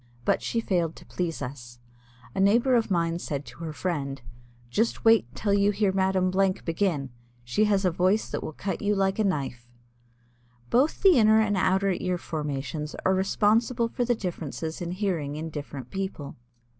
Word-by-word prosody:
But -, -, +2 dB
she 230 Hz, -, -1 dB
failed 175 Hz, -6 st, 0 dB
to -, -, -14 dB
please 165 Hz, -5 st, -3 dB
us. 120 Hz, -2 st, -8 dB, 0.6 s
A -, -, -4 dB
neighbor 235 Hz, +7 st, +4 dB
of 230 Hz, -3 st, +2 dB
mine 170 Hz, -2 st, 0 dB
said 145 Hz, -4 st, -4 dB
to 120 Hz, +4 st, -13 dB
her 160 Hz, -, -4 dB
friend: 145 Hz, -5 st, -3 dB, 0.5 s
"Just 225 Hz, -, 0 dB
wait 225 Hz, -, +6 dB
till 205 Hz, -2 st, 0 dB
you 200 Hz, 0 st, +4 dB
hear 205 Hz, -1 st, +1 dB
Madame 190 Hz, -1 st, +1 dB
Blank 190 Hz, 0 st, +1 dB
begin. 165 Hz, -6 st, -1 dB, 0.3 s
She 120 Hz, -, +1 dB
has 200 Hz, -2 st, +2 dB
a 180 Hz, -, +3 dB
voice 185 Hz, +5 st, +2 dB
that -, -, -2 dB
will -, -, -5 dB
cut 190 Hz, +5 st, -4 dB
you 205 Hz, 0 st, +1 dB
like 195 Hz, +1 st, +1 dB
a -, -, +3 dB
knife." 135 Hz, -, -2 dB, 1.0 s
Both 275 Hz, +10 st, +2 dB
the 370 Hz, -9 st, +7 dB
inner 220 Hz, 0 st, +6 dB
and 210 Hz, -2 st, +2 dB
outer 190 Hz, +1 st, +2 dB
ear 180 Hz, 0 st, -1 dB
formations 150 Hz, -2 st, -4 dB
are 190 Hz, -, +4 dB
responsible 225 Hz, +5 st, +2 dB
for 245 Hz, -, -1 dB
the 240 Hz, 0 st, +1 dB
differences 165 Hz, -4 st, -5 dB
in 170 Hz, -, -3 dB
hearing 175 Hz, -8 st, -2 dB
in 160 Hz, +1 st, -5 dB
different 145 Hz, -4 st, -7 dB
people. 190 Hz, -7 st, -5 dB
185 Hz, 180 wpm, -26 LUFS, 155-205 Hz, 1.0 s, the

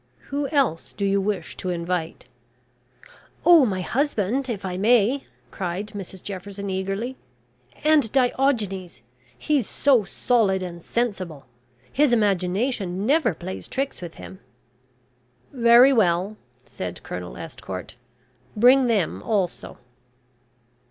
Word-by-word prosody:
Who 285 Hz, 0 st, 0 dB
else 270 Hz, -, 0 dB
do 200 Hz, -, -2 dB
you 195 Hz, 0 st, +2 dB
wish 195 Hz, -4 st, -3 dB
to 185 Hz, -, -4 dB
invite?" 170 Hz, -1 st, -3 dB, 1.2 s
"Oh, 335 Hz, -7 st, +7 dB
my 190 Hz, -3 st, -2 dB
husband, 260 Hz, +2 st, -1 dB
if 200 Hz, -4 st, -4 dB
I 180 Hz, -1 st, -3 dB
may," 235 Hz, +6 st, +3 dB, 0.2 s
cried 190 Hz, +3 st, -4 dB
Mrs 195 Hz, -3 st, -8 dB
Jefferson, 200 Hz, 0 st, -6 dB
eagerly, 195 Hz, +7 st, -3 dB, 0.7 s
"and 300 Hz, -7 st, +4 dB
Diogenes 235 Hz, -, 0 dB, 0.3 s
he's 280 Hz, -, 0 dB
so 265 Hz, -6 st, +3 dB
solid 200 Hz, -3 st, +1 dB
and 170 Hz, -1 st, -7 dB
sensible. 185 Hz, -, -3 dB, 0.5 s
His 285 Hz, -2 st, +3 dB
imagination 195 Hz, -1 st, 0 dB
never 285 Hz, -, +2 dB
plays 185 Hz, +3 st, -7 dB
tricks 275 Hz, -4 st, -3 dB
with 170 Hz, -2 st, -8 dB
him." 190 Hz, -, -11 dB, 1.1 s
"Very 240 Hz, +2 st, +6 dB
well," 195 Hz, -2 st, +2 dB, 0.3 s
said -, -, -7 dB
Colonel -, -, -7 dB
Estcourt, -, -, -7 dB, 0.6 s
"bring 250 Hz, +4 st, +6 dB
them 210 Hz, -8 st, 0 dB
also." 200 Hz, -6 st, -2 dB
205 Hz, 110 wpm, -24 LUFS, 185-255 Hz, 1.2 s, Oh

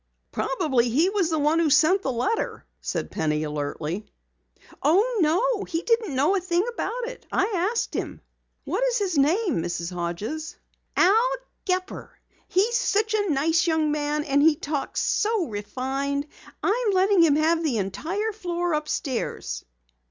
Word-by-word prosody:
"Probably 265 Hz, -5 st, +1 dB
he 315 Hz, +11 st, +2 dB
was 395 Hz, -5 st, +1 dB
the 320 Hz, -, 0 dB
one 300 Hz, +2 st, +2 dB
who 330 Hz, -2 st, +3 dB
sent 315 Hz, +7 st, +4 dB
the 270 Hz, -, -1 dB
letter," 390 Hz, -, -2 dB, 0.2 s
said -, -, -3 dB
Penny 155 Hz, -1 st, 0 dB
alertly. 150 Hz, +5 st, -4 dB, 0.7 s
"Oh, 410 Hz, -, +3 dB
no! 400 Hz, +8 st, +2 dB
He 330 Hz, 0 st, -3 dB
didn't 455 Hz, -, +1 dB
know 285 Hz, +8 st, +3 dB
anything 365 Hz, +1 st, 0 dB
about 480 Hz, +1 st, -3 dB
it. -, -, -9 dB
I 390 Hz, -2 st, +1 dB
asked 465 Hz, -, -2 dB
him." -, -, -4 dB, 0.5 s
"What -, -, -1 dB
is -, -, +2 dB
his 390 Hz, -5 st, -1 dB
name, 325 Hz, -, +2 dB
Mrs. 175 Hz, +1 st, -3 dB
Hodges?" 190 Hz, -, -4 dB, 0.4 s
"Al 445 Hz, +7 st, +5 dB, 0.4 s
Gepper. 370 Hz, 0 st, -3 dB, 0.3 s
He's 430 Hz, +6 st, +2 dB
such 430 Hz, -1 st, +1 dB
a 410 Hz, -2 st, +1 dB
nice 320 Hz, +4 st, +2 dB
young 320 Hz, -2 st, +2 dB
man 300 Hz, 0 st, -1 dB
and 285 Hz, -1 st, +2 dB
he 310 Hz, 0 st, +5 dB
talks 290 Hz, -2 st, -3 dB
so 435 Hz, -4 st, +1 dB
refined. 270 Hz, +6 st, -3 dB, 0.4 s
I 470 Hz, +5 st, +1 dB
am 405 Hz, -, +2 dB
letting 380 Hz, 0 st, +4 dB
him 315 Hz, -4 st, +5 dB
have 325 Hz, +2 st, +2 dB
the 275 Hz, -8 st, 0 dB
entire 315 Hz, -, -2 dB
floor 350 Hz, -4 st, -2 dB
upstairs." 270 Hz, -, -3 dB
320 Hz, 150 wpm, -25 LUFS, 275-400 Hz, 0.7 s, Al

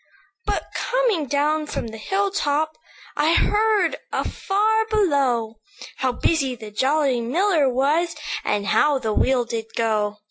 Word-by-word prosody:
"But, 415 Hz, -, 0 dB
coming 475 Hz, -, 0 dB
down 300 Hz, +2 st, 0 dB
from 230 Hz, -, -4 dB
the 220 Hz, 0 st, -9 dB
hill 390 Hz, -, -1 dB
top, 310 Hz, -3 st, 0 dB, 0.4 s
I 315 Hz, +3 st, +3 dB
heard 420 Hz, -4 st, +2 dB
afar 440 Hz, +3 st, 0 dB
below, 270 Hz, -, +1 dB, 0.4 s
How 260 Hz, -1 st, 0 dB
busy 270 Hz, 0 st, 0 dB
the 215 Hz, -2 st, -10 dB
jolly 265 Hz, +2 st, +1 dB
miller 310 Hz, -, +2 dB
was, 300 Hz, +7 st, +1 dB, 0.3 s
And 205 Hz, -1 st, -1 dB
how 290 Hz, +7 st, +3 dB
the 220 Hz, -4 st, -2 dB
wheel 255 Hz, +2 st, +2 dB
did 230 Hz, -1 st, -4 dB
go. 215 Hz, -2 st, 0 dB
290 Hz, 135 wpm, -22 LUFS, 240-370 Hz, 0.4 s, I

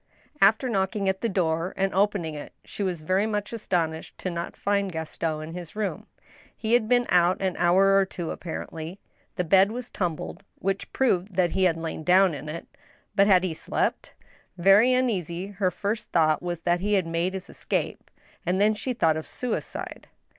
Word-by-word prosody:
After 220 Hz, +6 st, +5 dB
knocking 195 Hz, -2 st, 0 dB
at 190 Hz, 0 st, 0 dB
the 230 Hz, -, 0 dB
door 170 Hz, -2 st, 0 dB
and 195 Hz, 0 st, 0 dB
opening 195 Hz, -5 st, +1 dB
it, 150 Hz, -, -8 dB
she -, -, -7 dB
was 180 Hz, -5 st, -1 dB
very. 185 Hz, +6 st, +1 dB
much 210 Hz, 0 st, -3 dB
astonished 165 Hz, -7 st, -2 dB
not 170 Hz, -2 st, -3 dB
to -, -, -28 dB
find 200 Hz, -1 st, 0 dB
Gaston 160 Hz, -1 st, -3 dB
in -, -, -8 dB
his 175 Hz, -1 st, -8 dB
room. 210 Hz, -2 st, -3 dB, 0.5 s
He 225 Hz, +1 st, -1 dB
had 230 Hz, -2 st, +3 dB
been 245 Hz, -1 st, +4 dB
out 175 Hz, +1 st, +4 dB
an 190 Hz, -2 st, -1 dB
hour 190 Hz, +3 st, +4 dB
or 195 Hz, -, +5 dB
two, 175 Hz, -3 st, -5 dB
apparently. 165 Hz, +1 st, -6 dB, 0.4 s
The 180 Hz, -, 0 dB
bed 190 Hz, +4 st, +5 dB
was 245 Hz, +1 st, -6 dB
tumbled, 175 Hz, +1 st, -3 dB
which 195 Hz, +1 st, -2 dB
proved 195 Hz, -7 st, +1 dB
that 180 Hz, -2 st, +2 dB
he 190 Hz, -, +2 dB
had 165 Hz, -3 st, +2 dB
lain 165 Hz, -1 st, -5 dB
down 185 Hz, +1 st, +5 dB
in 145 Hz, +1 st, -6 dB
it. 165 Hz, +2 st, -6 dB, 0.5 s
But 200 Hz, -1 st, +4 dB
had 185 Hz, -3 st, +5 dB
he 180 Hz, -3 st, -1 dB
slept? -, -, -2 dB, 0.4 s
Very 195 Hz, +7 st, +6 dB
uneasy, 190 Hz, -9 st, 0 dB
her 195 Hz, -2 st, 0 dB
first 200 Hz, +5 st, -3 dB
thought 155 Hz, -2 st, +3 dB
was 175 Hz, -2 st, -4 dB
that 175 Hz, +1 st, +1 dB
he 205 Hz, +3 st, +1 dB
had 190 Hz, -3 st, +2 dB
made 170 Hz, +3 st, -1 dB
his 190 Hz, -, -6 dB
escape, -, -, -3 dB, 0.3 s
and 180 Hz, +2 st, 0 dB
then 210 Hz, +2 st, +4 dB
she 250 Hz, +4 st, -3 dB
thought 160 Hz, -9 st, +2 dB
ot' 155 Hz, -, -5 dB
suicide. 250 Hz, -2 st, -5 dB
185 Hz, 190 wpm, -26 LUFS, 170-205 Hz, 0.5 s, Very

